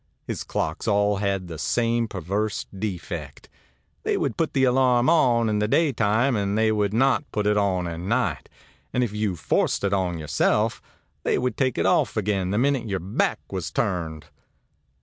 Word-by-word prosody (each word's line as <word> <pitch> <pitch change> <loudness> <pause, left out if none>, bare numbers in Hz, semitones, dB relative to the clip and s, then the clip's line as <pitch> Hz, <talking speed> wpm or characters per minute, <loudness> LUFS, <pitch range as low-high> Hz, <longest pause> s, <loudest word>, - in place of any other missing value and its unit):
His - - -4
clocks 80 +7 -3
all 105 -1 +2
had 100 -2 -1
the 80 -3 -7
same 115 +4 +1
perverse 100 +3 -2
defect: 85 -7 -5 0.5
they - - 0
would - - -1
put 165 - -1
the 135 - +2
alarm 125 +1 +4
on 120 -8 +3
in 105 -1 +1
the 105 - +1
daytime, 120 -3 +2
and 100 0 0
they 110 0 +3
would 105 -2 +1
not 135 +5 +1
put 105 -1 -1
it 105 0 +3
on 95 -4 +1
at 85 -1 -5
night; 115 +8 -1 0.4
and 125 - +2
if 110 -4 -2
you 105 -3 -1
forced 85 - 0
it 100 0 +1
on 90 -3 0
yourself, 75 -2 +1 0.4
they - - +1
would 125 0 -1
take 130 -3 0
it - - +1
off - - +2
again 100 -3 0
the 100 - 0
minute 135 -1 +1
your 100 - 0
back 95 +4 -1
was - - -3
turned. 80 -6 -2
105 Hz, 180 wpm, -24 LUFS, 95-120 Hz, 0.5 s, alarm